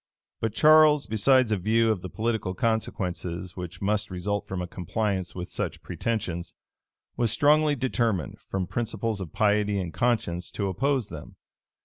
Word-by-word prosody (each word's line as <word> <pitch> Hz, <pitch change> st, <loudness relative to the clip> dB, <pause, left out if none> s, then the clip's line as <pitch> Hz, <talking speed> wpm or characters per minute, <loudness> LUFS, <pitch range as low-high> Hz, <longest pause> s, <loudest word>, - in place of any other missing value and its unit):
But 110 Hz, -1 st, -2 dB
Charles, 155 Hz, -1 st, +6 dB
besides 120 Hz, +2 st, +3 dB
a 105 Hz, -, +2 dB
view 110 Hz, +4 st, +2 dB
of 100 Hz, -5 st, -2 dB
the 95 Hz, -, -6 dB
political 110 Hz, -4 st, -2 dB
consequences 90 Hz, -5 st, -2 dB
which 90 Hz, 0 st, -7 dB
must 105 Hz, +1 st, 0 dB
result 100 Hz, +3 st, -3 dB
from 95 Hz, -, -4 dB
a 90 Hz, -, -2 dB
compliance 95 Hz, +1 st, -2 dB
with 90 Hz, -1 st, -5 dB
such -, -, -4 dB
pretensions, 90 Hz, -7 st, -3 dB, 0.6 s
was 120 Hz, -1 st, +2 dB
strongly 150 Hz, +5 st, +4 dB
determined, 115 Hz, -, -1 dB
from 95 Hz, -1 st, -3 dB
principles 110 Hz, 0 st, -2 dB
of 85 Hz, -5 st, -6 dB
piety 105 Hz, -1 st, +2 dB
and 90 Hz, -3 st, -3 dB
conscience, 110 Hz, -8 st, 0 dB
to 100 Hz, -2 st, -1 dB
oppose 130 Hz, +4 st, 0 dB
them. 75 Hz, -3 st, -9 dB
105 Hz, 150 wpm, -26 LUFS, 90-115 Hz, 0.6 s, Charles